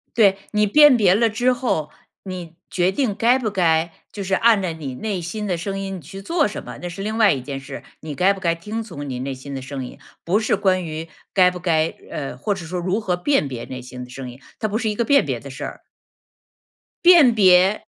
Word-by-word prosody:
对， 200 -4 +4
你 210 0 +3
辨 295 +5 +7
别 195 -5 +4
了 230 +3 +3
之 245 +4 +1
后， 200 - -1 0.3
你 180 -4 -7 0.2
决 180 0 +2
定 230 -1 0
该 235 +5 +3
不 230 -5 -2
该 170 -4 +1 0.2
就 205 - -5
是 190 0 0
按 225 0 +4
着 180 -3 -2
你 150 -5 -6
内 200 +3 -3
心 210 +5 -4
的 180 -3 0
声 195 +3 -4
音 195 -1 -4
你 - - -8
去 180 +6 -10
做 330 - +1
什 205 - -6
么， - - -9
那 175 - -3
是 180 +3 -7
另 215 +2 -3
外 220 -3 +6
一 135 - -2
件 135 +1 -6
事， 135 0 -8 0.2
你 155 -2 -6
该 185 +8 +3
不 195 - -9
该 170 -2 +1
听 210 +7 -5
从 145 -10 -8
你 125 -2 -4
内 135 +1 -3
心 140 +2 -9
的 135 - -5
声 135 0 -6
音， - - -12 0.3
不 185 +5 +2
是 215 - +1
关 190 -2 +1
于 160 0 -6 0.2
该 185 -2 +5
不 180 - -7
该 165 -2 +1 0.2
呃， 140 -3 -5
或 200 +11 -1
是 180 -4 -8
说 180 +3 -4
如 185 +5 -1
何 185 -5 -1
辨 180 - +1
别 125 -3 -6
内 130 -1 -7
心 125 0 -8
的 125 - -14
声 125 0 -7
音， 125 +2 -14 0.2
它 215 - -1
不 210 +1 -1
是 225 -2 -1
一 - - -2
个 235 - 0
辨 280 +2 +4
别 - - -2
的 - - -10
事 - - -7
儿。 - - -7 1.2
辨 340 -8 +8
别 190 -1 +5
185 Hz, 265 characters per minute, -21 LUFS, 155-215 Hz, 1.2 s, 辨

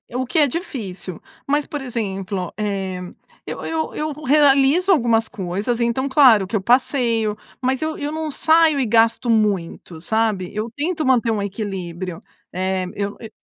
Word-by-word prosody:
o 255 +1 -1
que 255 +6 0
é 295 - +5
difícil. 210 - -6 0.3
Mas, 290 +1 +1
por 295 -3 -5
exemplo, 195 -6 -3
eh, 195 -3 -2 0.5
eu - - -6
eu 320 -1 -2
eu 305 0 -3
ro 300 +2 -10
realizo 290 +5 +4
algumas 230 -8 +2
coisas 200 +3 -3
então, 240 +3 0
claro 250 -8 +6
que 220 - -4
eu 205 - +1
passeio, 235 -2 +1 0.2
mas 260 +1 0
eu 315 0 -2
eu 295 0 -3
não 315 -1 -3
saio 315 0 +4
e 255 - +1
gasto 230 +2 +3
muito, 195 -6 0
sabe. 215 -2 0
Eu 215 +2 -3
tento 315 +2 -2
manter 250 -3 +3
um 215 -2 0
equilíbrio. 185 -4 -5 0.3
Eh, 185 0 -1
eu 200 0 -3
e 225 - -9
230 Hz, 165 wpm, -21 LUFS, 195-280 Hz, 0.5 s, claro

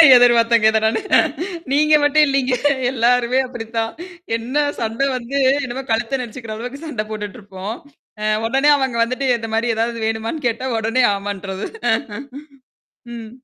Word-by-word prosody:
எதிர் 245 -1 +6
பார்த்தேங்க, 230 -1 +3
இத 220 - +2
நானு. 220 0 +1 0.7
நீங்க 305 +2 +3
மட்டும் 300 +1 +5
இல்லீங்க. 270 -2 +1 0.4
எல்லாருமே 245 +1 +2
அப்படித்தான். 225 -2 -4 0.4
என்ன 260 +6 -1
சண்ட 225 +2 -3 0.2
வந்து, 255 +3 -3 0.2
என்னமோ 260 +1 -4
கழுத்த 265 +4 0
நெருச்சுக்கிற 230 -2 -7
அளவுக்கு 250 +7 -7
சண்ட 225 -8 -3
போட்டுட்டு 210 +2 -6
இருப்போம். 200 +2 -6 0.5
அ 215 - 0 0.2
உடனே 270 +4 +3
அவங்க 265 -3 -1
வந்துட்டு, 255 +3 -2
இந்த 225 -1 -6
மாரி 230 +1 +1
ஏதாவது 230 +1 -1
வேணுமான்னு 225 +7 -3
கேட்டா, 235 +3 -2
உடனே 225 +4 +1
ஆமான்ட்டர்றது. 195 -1 -5 1.5
ம். 225 -2 -8
235 Hz, 140 wpm, -19 LUFS, 225-260 Hz, 1.5 s, எதிர்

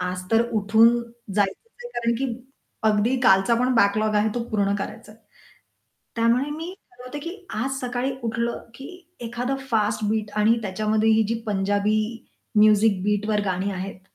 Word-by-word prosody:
आज 180 0 -3
तर 225 0 +4
उठून 220 +1 +5 0.5
जायचंच 205 - -1
आहे - - -6
कारण 235 0 0
की 270 - 0 0.6
अगदी 215 +4 +2
कालचा 195 -1 +4
पण 250 +2 +1
बॅकलॉग 215 0 +2
आहे 210 +1 +3
तो 240 - -1
पूर्ण 200 -2 +1
करायचा 215 +2 -7
आहे. 220 - -22 1.0
त्यामुळे 235 +5 +2
मी 325 +5 -6 0.2
ठरवते 250 +3 -9
की 335 +4 -6 0.2
"आज 265 +5 -2
सकाळी 250 +1 -2
उठलं 235 +1 -2
की 270 +3 -9 0.3
एखादं 240 +3 -3
फास्ट 215 -1 +1
बीट" 215 -1 -1
आणि 220 +2 +3
त्याच्यामध्ये 215 +2 +1
ही 220 0 +4
जी 230 - 0
पंजाबी 205 +1 +1 0.6
म्युझिक 210 -2 +5
बीटवर 210 +1 +1
गाणी 190 +1 -1
आहेत 185 0 -6
220 Hz, 155 wpm, -24 LUFS, 205-240 Hz, 1.0 s, उठून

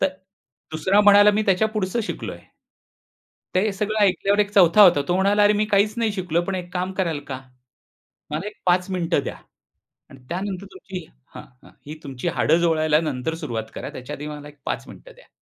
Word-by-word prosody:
तर 190 - +3 0.6
दुसरा 185 +6 +2
म्हणायला, 205 0 +7
"मी 210 +1 0
त्याच्या 200 +3 +3
पुढचं 215 +1 -2
शिकलोय." - - -6 1.2
ते 205 +3 +2
सगळं 210 +2 -2
ऐकल्यावर 200 +1 +2
एक 205 -1 +1
चौथा 195 0 +6
होता. 175 -7 +7
तो 175 - +1
म्हणाला, 200 +2 +3
"अरे 205 - +5
मी 210 +1 +1
काहीच 210 0 +2
नाही 230 -2 +1
शिकलोय. 180 -4 -1
पण 195 - -2
एक 175 -1 -6
काम 185 +1 -2
कराल 170 -6 -1
का? 130 -2 -4 0.9
मला 160 +7 -3
एक 210 - -9
5 180 +1 +2
मिनिटं 170 -5 0
द्या - - -5 0.7
आणि 135 - -14
त्यानंतर 190 +2 -4
तुमची 190 - -8 0.3
हां, - - -8 0.2
हां. - - -17 0.2
ही 155 - -6
तुमची 135 -4 -6
हाडं 160 - +3
जोडायला 155 -2 +2
नंतर 150 -1 -3
सुरुवात 115 -9 -5
करा, - - -6
त्याच्याआधी 145 +3 -7
मला 150 -1 -8
एक 145 - -19
5 - - -3
मिनिटं - - -13
द्या." - - -20
185 Hz, 185 wpm, -22 LUFS, 155-205 Hz, 1.2 s, म्हणायला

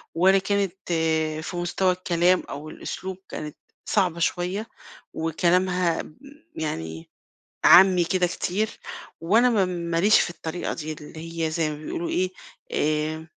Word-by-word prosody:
ولا 190 +3 +5
كانت 200 -1 0 0.7
في 175 - -5
مستوى 175 +2 +1
الكلام 180 0 +2
أو 145 +2 -7
الأسلوب 185 +3 -6
كانت 150 -1 -6 0.3
صعبة 180 -5 +1
شوية 180 +5 -1 0.5
وكلامها 175 +1 +1
ب 155 - -14 0.4
يعني 80 - -5 0.6
عامّي 180 -1 +8
كده 180 +1 +1
كتير 195 +4 -1 0.5
وأنا 220 +9 +4
ما 210 -5 +3
م - - -3
ماليش 170 +3 +3
في - - 0
الطريقة 175 0 -4
دي 155 -1 -5
اللي 160 +2 -6
هي - - -2
زي 160 -1 0
ما 150 - -5
بيقولوا 170 - -3
إيه، 185 0 0 0.4
آآ 155 +1 -1
175 Hz, 135 wpm, -25 LUFS, 160-185 Hz, 0.7 s, عامّي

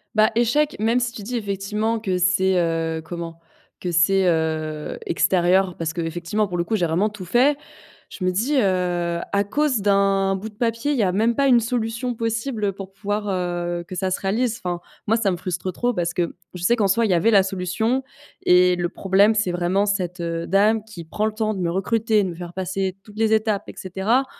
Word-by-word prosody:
Bah 215 0 +5
échec, 280 +6 +2
même 230 +3 +2
si 235 -1 -1
tu 210 - -9
dis 245 +4 -4
effectivement 210 +2 -1
que 190 -4 -1
c'est, 185 +1 +3
heu, 165 -1 0
comment? 165 -1 -7 0.4
Que 180 - -2
c'est, 185 +3 +3
heu, 155 -2 -2
extérieur 180 +1 +2
parce 160 -1 -3
qu'effectivement, 175 +5 -2
pour 180 - -5
le 170 - +1
coup, 220 +3 -1
j'ai 175 - +1
vraiment 180 +7 +1
tout 205 -3 -9
fait. 260 +9 +3 0.5
Je 185 - -8
me 185 - +2
dis, 240 +11 0
heu: 175 -3 0
«À 200 0 +3
cause 265 +1 0
d'un 195 -1 +2
bout 210 +4 -6
de - - -19
papier, 230 +5 -1
il 280 - 0
y 220 - +2
a 185 - +2
même 225 +4 +1
pas 280 0 +2
une 245 -2 +6
solution 235 +1 -2
possible 230 -2 -2
pour 195 0 -10
pouvoir, 205 +1 -3
heu, 175 -2 -2
que 185 - -7
ça 185 +1 -1
se - - -2
réalise». 225 +4 0
Enfin, 175 -1 -2 0.3
moi, 225 +2 +3
ça 205 -4 +1
me 175 - -2
frustre 180 +1 -3
trop 245 +6 0
parce 175 -2 -1
que 175 -2 -2 0.2
je 180 - -8
sais 235 +6 +4
qu'en 210 -4 +2
soi, 230 +4 +3
il 200 - +1
y - - +4
avait 200 +7 +3
la 200 -2 +7
solution 195 +7 -1 0.4
et 180 0 +5
le 175 -1 -1
problème, 195 +3 +3
c'est 210 -4 0
vraiment 180 +4 +1
cette, 180 -3 -1
heu, 165 0 -3
dame 210 +3 +3
qui 200 -6 -9
prend 210 +7 -2
le 220 - 0
temps 215 -1 -1
de - - -5
me 170 -2 0
recruter, 215 +2 +1
de 185 - -2
me 170 - -7
faire 175 0 -8
passer 190 0 -2
toutes 210 0 -15
les 220 0 +2
étapes 215 -2 +1
et - - -8
cetera, 200 +8 0
195 Hz, 220 wpm, -22 LUFS, 175-220 Hz, 0.5 s, la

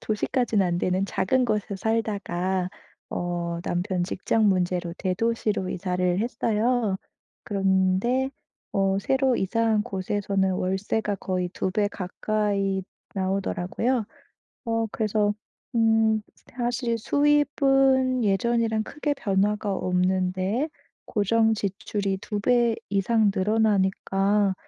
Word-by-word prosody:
도시까지는 215 -1 0
안 175 - 0
되는 185 +2 0
작은 250 +8 +1
곳에 210 -3 -1
살다가 190 -4 -1 0.4
어 175 -1 -3
남편 180 0 -1
직장 210 +4 +1
문제로 180 -2 0
대도시로 205 0 -1
이사를 180 -1 0
했어요. 225 -2 0 0.4
그런데 195 +6 +1 0.4
어 195 -1 +2
새로 265 +3 +2
이사한 220 +2 +1
곳에서는 195 -2 -1
월세가 195 +3 -1
거의 185 -1 -2
2 190 - -1
배 205 +2 +1
가까이 200 0 -1 0.3
나오더라고요. 195 +5 -1 0.6
어 225 -1 0
그래서 210 -1 +1 0.4
음 225 -1 +3 0.4
사실 240 -1 -1
수입은 270 -2 +3
예전이랑 220 +2 +1
크게 295 +5 -2
변화가 205 -2 0
없는데 185 - 0 0.4
고정 225 +2 +2
지출이 200 -1 -2
2 210 -1 -3
배 240 +1 +3
이상 205 +1 +2
늘어나니까 200 -1 +2
205 Hz, 235 characters per minute, -25 LUFS, 190-230 Hz, 0.6 s, 음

